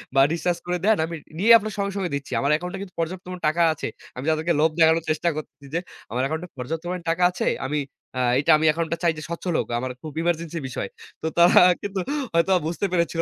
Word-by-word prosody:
বা 135 - +6
রিচার্জ 170 +1 0
করে 180 0 -1
দেন 220 0 +4
আমি 165 0 -6 0.2
নিয়েই 225 +5 +6
আপনার 215 -1 -5
সঙ্গে, 200 0 -1
সঙ্গে 185 -5 -2
দিচ্ছি।" 140 - -6
আমার 140 - 0
অ্যাকাউন্টে 180 +4 -2
কিন্তু 185 -3 -9
পর্যাপ্ত 180 +3 -3 0.2
টাকা 165 +3 +1
আছে। - - -5 0.3
আমি 125 +3 -6
যাদেরকে 160 +2 +1
লোভ 160 - +5
দেখানোর 160 0 +5
চেষ্টা 155 +2 +1
করছি 155 -2 -8
যে 170 - +1 0.3
আমার 125 +2 -1
অ্যাকাউন্টে 160 +5 -2
পর্যাপ্ত 160 +6 -4
পরিমাণে 180 -1 -4
টাকা 180 +2 0
আছে 180 - -3 0.2
আমি 150 +1 -1 0.4
আ - - +1 0.2
এইটা 160 +3 +3
আমি 160 - 0
এখন 165 +2 -1
এটা 165 - -2
চাই 170 -1 +3
যে 155 - -6
স্বচ্ছল 170 +1 -3
লোক। - - -1
আমার 130 0 -3
খুব 155 - -7
ইমার্জেন্সি 170 -1 -1
বিষয়। 110 -5 -4 0.3
তো 160 - -2
তারা 175 +1 +7 0.2
কিন্তু 200 -1 -3 0.3
হয়তো 170 +3 +3 0.2
বুঝতে 175 +4 -2
পেরেছিল 170 -1 +1
165 Hz, 225 wpm, -24 LUFS, 155-180 Hz, 0.4 s, তারা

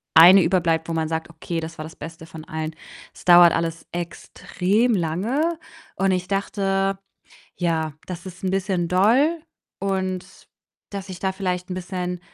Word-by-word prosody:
eine 180 +3 +9
überbleibt, 165 -2 +1
wo - - -1
man 160 -1 0
sagt: 160 0 -3
„Okay, 165 +1 -4
das 165 +1 -7
war 155 - -5
das 160 +1 -10
Beste 160 +1 -9
von 160 -1 -10
allen.“ 160 0 -4 0.4
Es - - -15
dauert 175 -1 +8
alles 165 0 -2
extrem 190 +5 -1
lange 235 - 0 0.4
und 195 +1 +1
ich 185 0 -1
dachte, 195 -1 0 0.6
ja, 160 -3 0
das 180 -1 -7
ist 185 0 -10
'n 185 - 0
bisschen 190 -3 0
doll 240 - +3 0.4
und 190 -1 -3 0.4
dass 200 -1 -6
ich 180 - -7
da 190 +1 -1
vielleicht 180 -2 -2
bisschen, 180 -1 -4
180 Hz, 155 wpm, -23 LUFS, 165-195 Hz, 0.6 s, eine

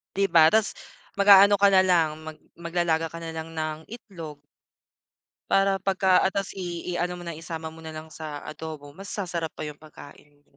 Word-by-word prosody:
Di 195 0 +2
ba 160 -2 +7
tas 220 -2 +3 0.5
mag-aano 200 0 +7
ka 200 +1 +5
nalang 180 -4 +4
mag 155 -1 -9 0.2
maglalaga 170 -1 -1
ka 165 - -8
nalang 160 -1 -6
ng 155 0 -3
itlog. 180 -10 -9 1.1
Para 195 0 +3
pagka 190 -1 +3
ah - - +2
tas 195 0 -3
i 175 -2 -5
i-ano 175 +1 -2
mo 175 - -9
na 170 - -5
isama 160 0 -7
mo 160 - -14
nalang 160 0 -9
sa 150 -2 -7
adobo 155 -2 -8
mas 195 +6 -11
sasarap 175 -6 -4
pa - - -6
yung 150 -1 -7
pagkain 150 -1 -14
mo. 145 - -32
170 Hz, 175 wpm, -25 LUFS, 160-190 Hz, 1.1 s, ba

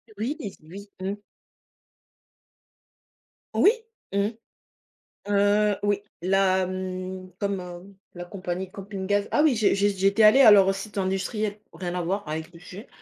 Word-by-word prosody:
Oui 235 +9 -2
s 205 -8 -7
oui, 200 +5 -11
mmh. 195 +2 -3 2.4
Oui, 415 - +6 0.4
mmh. 200 +1 +2 1.0
Heu, 205 +1 +3
oui. 205 -1 +1 0.2
La 190 0 +2
mmh, 185 0 -5
comme, 200 -1 -1
heu, 180 +2 -10 0.2
la 175 0 -7
compagnie 185 0 -5
de - - -23
Camping 195 0 -7
Gaz. 205 +1 +1
Ah - - +3
oui, 300 -5 +4
j'ai 215 -2 +3
j'ai 200 +1 +2
j'étais 195 +3 +3
allée 215 +6 +7
à 220 - +9
leur 195 -1 +6
site 200 +2 -8
industriel. 200 +2 -2
Rien 175 -2 -5
à 180 - -1
voir, 190 +1 -2
avec 160 +2 -5
le 170 - -13
sujet. 190 +6 -11
195 Hz, 150 wpm, -25 LUFS, 185-205 Hz, 2.4 s, à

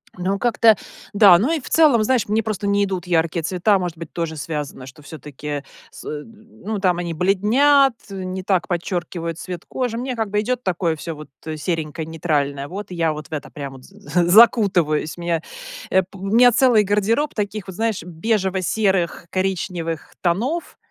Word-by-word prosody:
Ну, 190 +2 -2
как-то 230 -1 +4 0.4
да. 200 -4 +8
Ну 240 - +1
и 325 - 0
в 255 - -10
целом, 295 -9 +5
знаешь, 250 +1 +1
мне 215 +2 +1
просто 215 -2 -3
не 200 0 +2
идут 185 -3 -4
яркие 165 -1 +1
цвета. 185 +4 +2
Может 175 -2 -4
быть 165 -1 -8
тоже 165 -2 -3
связано, 145 -3 -5
что 130 +2 -13
все-таки 145 -1 -7 0.3
с - - -12
н 215 +9 -9
ну 215 +1 -3
там 180 -3 +2
они 170 -1 -3
бледнят, 230 - +4 0.2
не 190 -1 -5
так 185 -2 +1
подчеркивают 175 -2 -3
цвет 180 -2 -7
кожи. 245 -3 -2
Мне 255 +1 -3
как 225 -3 -2
бы 210 +1 0
идет 250 +3 -2
такое 175 -3 0
всё 165 +2 -6
вот 150 0 -11 0.3
серенькое, 160 -1 -3
нейтральное, 145 -4 -1
вот 195 +3 -7
и - - -5
я 165 -2 +1
вот 150 -2 -8
в - - -37
это 150 -1 -5
прямо 140 -2 -7
вот 130 - -16
з 195 - -19
з 175 -4 0
закутываюсь, 185 -9 +4
меня, 170 -2 -1 0.5
э, 190 - +3
п 190 +2 -15
у 190 - -7
меня 240 +4 +6
целый 240 -3 +4
гардероб 210 +8 +1
таких 205 -2 -3
вот, 190 - -8
знаешь, 225 0 -1
бежево-серых, 190 -1 0
коричневых 180 -4 -3
тонов. 240 - -1
185 Hz, 185 wpm, -21 LUFS, 165-215 Hz, 0.5 s, да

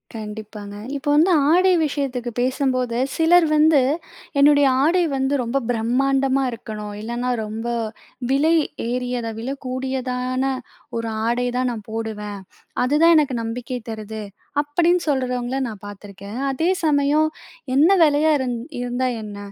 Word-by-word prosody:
கண்டிப்பாங்க 210 -1 -7 0.2
இப்போ 290 +1 -4
வந்து 325 +5 +5 0.2
ஆடை 365 +3 +5
விஷயத்துக்கு 265 -4 -2
பேசும்போது 255 -2 0 0.2
சிலர் 335 +1 +5
வந்து 305 -2 +5 0.6
என்னுடைய 285 0 +6 0.2
ஆடை 350 +3 +3
வந்து 265 +1 0
ரொம்ப 240 +3 -1
பிரம்மாண்டமா 270 +3 +1
இருக்கணும். 215 -2 -7
இல்லைனா 240 +3 -3 0.2
ரொம்ப 220 +2 -5 0.6
விலை 290 +5 +3 0.4
ஏறியதா 245 -2 -2
விலைக்கூடியதான 255 0 -3 0.5
ஒரு 230 0 -3 0.2
ஆடை 240 +2 +1
தான் 255 0 +1
நான் 220 -3 -6
போடுவேன். 210 -2 -4 0.4
அதுதான் 300 +6 +5
எனக்கு 280 -5 +2
நம்பிக்கை 235 +2 -4
தருது 220 0 -6 0.4
அப்படின்னு 345 +4 +2
சொல்றவங்கல 255 -1 -1
நான் 210 -3 -9
பார்த்துருக்கேன். 205 +2 -9
அதே 320 +6 0
சமயம் 295 0 +3 0.5
என்ன 295 +5 +6 0.2
விலையா 305 +1 +4
இருந் 250 -2 -2 0.2
இருந்தா 245 +1 -1
என்ன? 205 -1 -8
255 Hz, 120 wpm, -22 LUFS, 230-285 Hz, 0.6 s, என்னுடைய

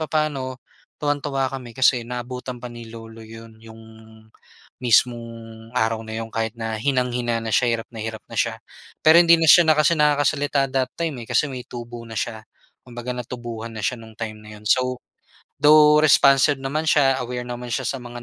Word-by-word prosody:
papaano, 150 -5 -2 0.4
tuwang-tuwa 145 -2 -1
kami 125 -4 -8
kasi 125 -2 +4
naabutan 125 +1 -6
pa 125 - -7
ni 115 -1 -10
lolo 115 0 -11
'yon, 115 0 -13
'yong 115 0 -13 1.0
mismong 120 0 +3 0.5
araw 115 -1 0
na 110 - -7
'yon 115 - -7
kahit 110 0 -2
na 110 -1 -3
hinang-hina 125 -2 0
na 115 - -4
siya, 120 -2 +3
hirap - - -17
na 115 - -11
hirap 110 -1 -6
na - - -9
siya. - - -1 0.4
Pero 160 +1 +7
hindi 170 -1 +5
na 160 - +2
siya 175 +1 +8
na 155 - +6
kasi 155 +2 +3
nakakasalita 145 -1 +1
that 130 -1 -1
time 155 -8 -4
eh, - - -14
kasi 150 - +1
may 125 -2 -7
tubo 120 -1 -8
na 115 - -9
siya. 110 0 -4 0.4
Kumbaga 120 0 -6
natubuhan 120 -2 -7
na 110 - -5
siya 125 - -1
nung 110 -1 -13
time 110 -2 -6
na 105 0 -12
'yon 105 - -7
so, 125 0 +1 0.6
though 150 +1 +6
responsive 140 -1 +5
naman 140 +4 -3
siya, 135 -3 +3
aware 125 0 -5
naman 125 0 -6
siya 130 - -2
sa 135 - -3
mga 120 0 -9
125 Hz, 190 wpm, -22 LUFS, 115-140 Hz, 1.0 s, siya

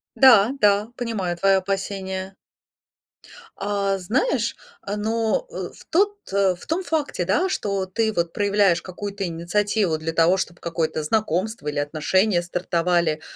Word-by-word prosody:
Да, 245 -4 +7
да, 205 +1 +3
понимаю 215 -8 -2
твое 195 +1 +4
опасение. 190 0 -3 1.2
А 200 -1 -1
знаешь, 240 - 0 0.3
а 200 +1 -4
ну, 225 - 0
э, - - -5
в - - -16
тот 400 +5 +2 0.2
э, 195 -2 +3
в 175 - -14
том 340 +4 -1
факте, 305 - -1
да, 350 - +1
что 200 - -1
ты 220 +4 0
вот 170 -4 -1
проявляешь 200 -4 +2
какую-то 200 +2 -5
инициативу 180 +2 0
для 165 +1 -3
того, 165 +3 +3
чтоб 175 -2 -4
какое-то 160 -2 -2
знакомство 215 +1 -1
или 150 0 -2
отношения 175 +6 +1
стартовали, 170 -2 0
195 Hz, 140 wpm, -23 LUFS, 175-210 Hz, 1.2 s, Да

